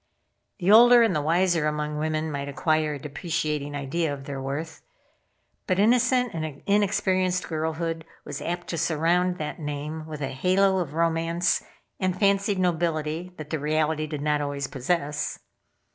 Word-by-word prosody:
The 185 +1 +2
older 240 +2 +8
and 220 -7 +2
the 150 - +1
wiser 170 0 +2
among 150 0 -2
women 155 0 -1
might 140 -1 -4
acquire 155 +1 0
a - - -7
depreciating 150 0 -3
idea 145 +3 -1
of 140 -1 -6
their 140 -1 -5
worth, 145 +4 -5 0.9
but 185 - +1
innocent 245 +3 +3
and 155 -3 -5
inexperienced 185 -2 +1
girlhood 160 +1 -2 0.2
was 145 0 -6
apt 175 +3 -3
to 170 - -2
surround 175 +3 +1
that 155 0 -5
name 150 +1 -5
with 155 -1 -7
a 135 - -2
halo 190 +7 +2
of 155 -4 -4
romance 165 +1 +1 0.4
and 185 -1 0
fancied 200 0 +2
nobility 170 -1 -1
that 155 -1 -8
the 155 - -1
reality 155 +1 0
did 150 -2 -5
not 150 -1 +1
always 145 -1 -2
possess. 145 +3 -2
160 Hz, 155 wpm, -26 LUFS, 150-180 Hz, 0.9 s, older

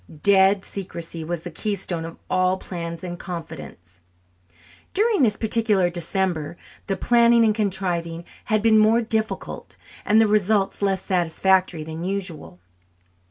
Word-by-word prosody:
"Dead" 195 0 +4
secrecy 170 -4 -7
was 170 0 -4
the 175 - -7
keystone 175 -3 -3
of 165 - -9
all 185 0 +1
plans 170 -2 -6
and 175 -1 -6
confidences. 95 - -9 1.0
During 430 -2 +2
this 215 -5 +3
particular 215 -5 +2
December 170 -2 -2 0.3
the 195 - -1
planning 235 -1 +4
and 215 - +3
contriving 180 -5 -2 0.2
had 215 -2 +1
been 220 -1 +5
more 225 +2 +4
difficult 220 0 -3 0.3
and 215 +2 +4
the 225 - +6
results 210 -1 +1
less 195 -2 0
satisfactory 180 -1 +1
than 160 +1 -6
usual. 185 - -4
190 Hz, 130 wpm, -23 LUFS, 170-215 Hz, 1.0 s, the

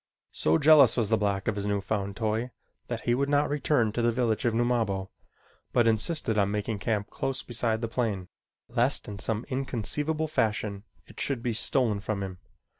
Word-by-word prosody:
So 80 +1 +2
jealous 145 - +6
was 115 -3 +1
the 110 - +5
black 100 -2 -1
of 110 - +1
his 100 0 -3
new 100 0 +1
found 100 -1 -3
toy 110 +2 -1 0.4
that 120 -2 -4
he 120 - +1
would 140 +3 0
not 145 0 +2
return 140 -6 +1
to 120 - -2
the 120 0 +3
village 120 0 0
of 120 - +2
Numabo, 115 -5 0 0.6
but 120 - +4
insisted 110 0 +1
on 100 -1 +2
making 105 +1 -2
camp 105 -1 -2
close 135 0 -3
beside 115 -2 0
the 115 - -1
plane, 110 -6 -2 0.4
lest - - +1
in 100 -1 -7
some 110 +2 -1
inconceivable 140 +4 -1
fashion 105 -7 -1 0.2
it - - -14
should 130 -4 -1
be 120 - 0
stolen 110 -2 +1
from 100 0 -3
him. 95 -2 -7
115 Hz, 190 wpm, -28 LUFS, 105-125 Hz, 0.6 s, jealous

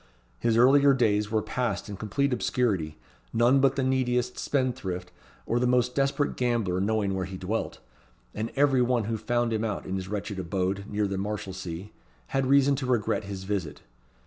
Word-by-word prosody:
His 115 -1 +2
earlier 140 +3 +6
days 105 -4 +2
were 110 -1 0
passed 125 -1 -2
in 105 - -6
complete 135 +7 -1
obscurity, 105 -10 0 0.3
none 120 +4 +4
but 135 0 +3
the 135 - 0
neediest 125 -1 0
spendthrift 120 -10 -2 0.3
or 120 - 0
the 125 - +2
most 125 0 +2
desperate 140 +2 0
gambler 115 -7 0
knowing 105 -1 0
where 95 -1 -2
he 95 0 -7
dwelt, 100 +5 -3 0.6
and 110 +2 -3
every 135 -2 +4
one 125 -2 +2
who 110 +2 -2
found 120 +1 0
him 110 0 -1
out 110 -3 -3
in 95 +1 -2
his 95 0 -5
wretched 100 0 -4
abode 95 +2 -2
near 105 0 0
the 95 -1 -2
Marshalsea 95 -2 -5 0.4
had 135 -1 0
reason 140 +1 +5
to 130 -2 -3
regret 115 -4 0
his 100 -1 -6
visit. 95 -6 -3
110 Hz, 175 wpm, -27 LUFS, 100-125 Hz, 0.6 s, earlier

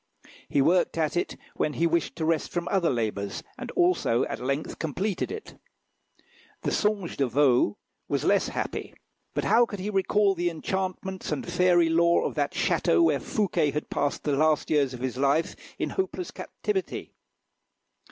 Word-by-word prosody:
He 140 - +3
worked 175 +3 +2
at 155 -1 0
it 175 - -1 0.2
when 150 - -1
he 165 - +1
wished 170 0 0
to 160 -1 -2
rest 160 -1 +1
from 175 -1 -2
other 185 -4 +2
labours, 105 -5 -2
and 255 - -7
also 350 - +2
at - - -5
length 140 +4 -3
completed 185 +5 -2
it. 435 0 -8 1.0
The - - 0
"Songe 205 -4 0
de 135 - +1
Vaux" 125 -5 +3 0.3
was - - -1
less - - +3
happy; - - -4 0.4
but - - 0
how 240 0 +4
could 205 - -6
he 200 +3 -3
recall 200 +1 +3
the 175 -1 0
enchantments 190 +2 -3
and 150 - -2
fairy 175 -1 +4
lore 170 +1 +3
of - - -2
that - - -1
château 340 - +2
where - - +3
Fouquet 200 -8 0
had 150 +1 -4
passed 145 - -1
the 145 -2 +1
last 155 +2 +2
years 140 -4 +2
of 120 - -10
his 130 -1 -3
life 140 +4 +1 0.2
in - - -2
hopeless 375 -2 -3
captivity? 395 -3 -4
170 Hz, 170 wpm, -27 LUFS, 145-195 Hz, 1.0 s, how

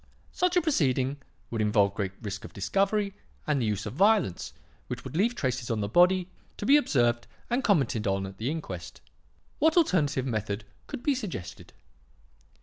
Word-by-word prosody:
Such 360 0 +1
a 355 - +3
proceeding 135 - +1 0.3
would 115 -2 -1
involve 105 -2 +3
great 95 -2 -3
risk 100 -1 -5
of - - -10
discovery 200 - 0 0.3
and 145 -3 +1
the 115 - 0
use 105 -1 -1
of - - -5
violence 195 - +2 0.4
which - - -5
would - - -8
leave 225 +8 +2
traces 130 - -2
on 115 -2 0
the 100 - -1
body, 180 - +4 0.3
to - - -4
be 275 - +6
observed 120 - +2 0.2
and 250 +3 +1
commented 135 - +2
on 95 0 0
at 95 0 -9
the 115 +4 -1
inquest. 95 - -6 0.6
What 320 +3 +3
alternative 150 - +2
method 105 -4 -2 0.2
could - - -6
be 290 - +3
suggested? 205 - -6
135 Hz, 170 wpm, -28 LUFS, -, 0.6 s, be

